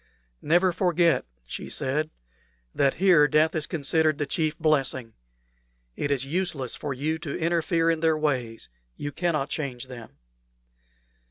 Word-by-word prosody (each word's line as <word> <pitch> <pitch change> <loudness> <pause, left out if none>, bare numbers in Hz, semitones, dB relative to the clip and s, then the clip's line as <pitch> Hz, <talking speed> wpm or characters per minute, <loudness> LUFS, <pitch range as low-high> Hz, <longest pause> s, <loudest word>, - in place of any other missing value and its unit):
"Never 175 +4 +3
forget," 170 -5 +2 0.2
she - - -6
said, 150 +4 -1 0.6
"that 140 -1 +2
here 175 -5 +5
death 155 +2 +3
is 155 -2 -1
considered 155 -1 +1
the 145 - -1
chief 155 +2 0
blessing. 135 -7 0 0.8
It 145 - -2
is 135 -2 +1
useless 145 -5 -2
for 145 - -5
you 150 +5 -2
to 155 -4 -4
interfere 165 0 +1
in 165 - -1
their 160 -1 +2
ways. 130 -7 -2 0.3
You 145 - -4
cannot 155 -4 -1
change 135 -5 -4
them." 120 -3 -11
155 Hz, 140 wpm, -26 LUFS, 135-165 Hz, 0.8 s, here